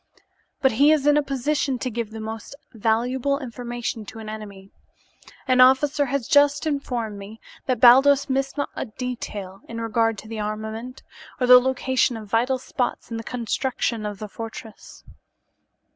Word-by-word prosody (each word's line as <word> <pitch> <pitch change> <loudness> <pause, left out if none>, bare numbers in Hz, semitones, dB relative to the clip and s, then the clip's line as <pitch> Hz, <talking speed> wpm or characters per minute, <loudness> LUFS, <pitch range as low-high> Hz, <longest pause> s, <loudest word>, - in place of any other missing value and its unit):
" - - -44
but 265 - +5
he 280 +7 +4
is 300 -3 +2
in 295 0 +5
a 295 - +4
position 275 0 -1
to 255 +1 -4
give 230 -1 -3
the 220 0 -8
most 220 +4 -7 0.2
valuable 240 +5 0
information 240 -3 -5
to 210 - -11
an 220 -1 -8
enemy. 200 -3 -9 0.8
An 255 -1 +4
officer 275 +3 +4
has 275 -3 -2
just 285 +1 +4
informed 245 -8 -3
me 210 +3 -10 0.3
that 255 -2 0
Baldos 270 +3 +6
missed 270 +1 -1
not 285 - -2
a - - -3
detail 215 -5 -6
in 230 0 -5
regard 225 0 0
to 215 - -10
the 225 0 -6
armament, 220 +4 -5 0.4
or 250 - +2
the 250 0 +9
location 260 -1 0
of 215 -1 -9
vital 240 +5 +1
spots 255 -1 -3
in 230 - -3
the 225 - -6
construction 240 -1 -2
of 210 -1 -4
the 215 +1 -7
fortress." 225 0 -10
240 Hz, 170 wpm, -23 LUFS, 220-265 Hz, 0.8 s, the